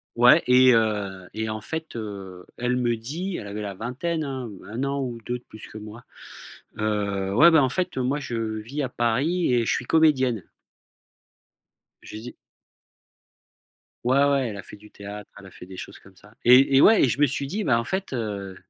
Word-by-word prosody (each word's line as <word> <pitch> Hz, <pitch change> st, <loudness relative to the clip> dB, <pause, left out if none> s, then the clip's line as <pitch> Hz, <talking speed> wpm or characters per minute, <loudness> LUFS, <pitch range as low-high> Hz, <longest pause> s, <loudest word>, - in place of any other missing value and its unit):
Ouais, 125 Hz, +7 st, +6 dB
et 125 Hz, 0 st, +6 dB
heu, 100 Hz, -5 st, -1 dB
et 110 Hz, 0 st, -2 dB
en 110 Hz, 0 st, -4 dB
fait, 160 Hz, +4 st, -5 dB
heu, 100 Hz, -5 st, -7 dB
elle 125 Hz, +1 st, 0 dB
me 120 Hz, -2 st, 0 dB
dit 165 Hz, +11 st, -5 dB
elle -, -, -7 dB
avait 100 Hz, +1 st, -6 dB
la 100 Hz, -2 st, -5 dB
vingtaine 145 Hz, -, -3 dB
hein, 130 Hz, -4 st, -5 dB, 0.2 s
1 115 Hz, +5 st, -4 dB
an 140 Hz, 0 st, -1 dB
ou 120 Hz, -3 st, -4 dB
2 125 Hz, 0 st, -2 dB
de 125 Hz, -, -20 dB
plus 110 Hz, -, -12 dB
que 110 Hz, -, -11 dB
moi: 110 Hz, +3 st, -10 dB, 0.7 s
«Heu, 100 Hz, -2 st, -1 dB
ouais 165 Hz, +9 st, +7 dB
beh, 160 Hz, -, +5 dB
en 135 Hz, -3 st, +4 dB
fait, 180 Hz, 0 st, -2 dB
moi 130 Hz, +3 st, 0 dB
je 120 Hz, -4 st, -5 dB, 0.2 s
vis 140 Hz, +7 st, -5 dB
à 130 Hz, -, -2 dB
Paris 130 Hz, +8 st, 0 dB
et 120 Hz, -2 st, +2 dB
je -, -, +1 dB
suis 125 Hz, -, -3 dB
comédienne». 130 Hz, -, +2 dB, 1.6 s
Je -, -, -11 dB
dis 120 Hz, +3 st, -9 dB, 1.7 s
Ouais 130 Hz, +3 st, +3 dB
ouais, 140 Hz, -2 st, +1 dB
elle 100 Hz, -, -7 dB
a 100 Hz, -, -8 dB
fait -, -, -12 dB
du 105 Hz, +1 st, -17 dB
théâtre, 105 Hz, 0 st, -9 dB
elle 100 Hz, -, -13 dB
a 95 Hz, -, -14 dB
fait -, -, -12 dB
des 95 Hz, -, -11 dB
choses -, -, -9 dB
comme 95 Hz, -1 st, -19 dB
ça 105 Hz, +4 st, -20 dB
et 130 Hz, +3 st, +6 dB
et 135 Hz, -, +7 dB
ouais, 220 Hz, -, +6 dB
et 130 Hz, -, +4 dB
je 130 Hz, -, -2 dB
me 145 Hz, -, +6 dB
suis 140 Hz, 0 st, -3 dB
dit: 205 Hz, +8 st, -3 dB
«Bah, 115 Hz, -7 st, +2 dB
en -, -, -2 dB
fait 190 Hz, +3 st, -3 dB
heu 100 Hz, -5 st, -4 dB
120 Hz, 210 wpm, -24 LUFS, 105-140 Hz, 1.7 s, ouais